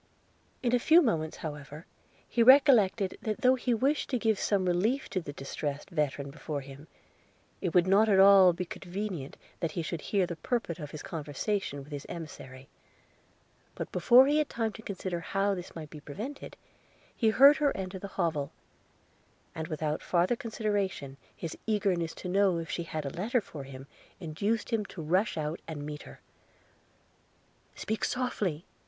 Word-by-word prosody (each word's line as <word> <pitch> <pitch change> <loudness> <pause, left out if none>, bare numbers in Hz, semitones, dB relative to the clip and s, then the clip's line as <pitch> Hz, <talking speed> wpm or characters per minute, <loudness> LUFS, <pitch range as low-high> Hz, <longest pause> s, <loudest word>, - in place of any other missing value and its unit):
In 245 -1 +1
a 245 - +4
few 320 +7 +6
moments, 165 - 0
however, 150 +1 -7 0.4
he 235 - 0
recollected, 230 -7 +5
that 215 -1 -3
though 255 +1 +6
he 250 -1 -1
wished 270 +6 +1
to 255 - +1
give 220 -3 +1
some 195 -3 +1
relief 210 +10 +1
to 185 - -1
the 145 - -7
distressed 145 +3 -5
veteran 145 -3 -1
before 145 -1 -5
him, 140 +3 -12 0.7
it 180 -3 -2
would 180 -1 +6
not 200 +4 +4
be 210 - +4
at 190 - +5
all 195 -2 +8
convenient 180 -2 -5 0.2
that 165 -3 -2
he 170 - -2
should 160 0 -4
hear 195 -3 +1
the 170 -1 -6
purport 185 -3 -2
of 150 -2 -6
his 155 - -8
conversation 150 0 -3
with 145 - -15
his 145 -2 -6
emissary; 135 -5 -9 1.1
but - - -5
before 255 +2 +6
he 295 +2 +3
had 305 - 0
time 225 -2 -2
to - - -10
consider 185 -4 -4
how 195 +4 0
this 180 -2 -7
might 155 -3 -8
be 150 - -9
prevented, 215 - -7 0.6
he 225 - +3
heard 275 +6 +7
her 290 -2 +2
enter 190 0 -5
the 200 - -6
hovel; 160 -6 0 1.0
and, 160 0 -5
without 155 -1 -2
farther 180 +6 +2
consideration, 205 - -2 0.2
his 165 -2 -6
eagerness 190 -6 0
to - - -7
know 190 -1 +3
if 165 -1 -5
she - - -2
had 155 -3 -5
a 140 - -3
letter 220 - 0
for 150 -9 -9
him, 135 0 -10 0.3
induced 200 +8 -2
him 225 -2 +1
to 190 - -11
rush 180 +6 +1
out 155 +2 -2
and 150 -3 -6
meet 150 0 -6
her. - - -13 1.5
'Speak 220 - -3
softly!' 205 -10 -1
185 Hz, 170 wpm, -30 LUFS, 155-220 Hz, 1.5 s, all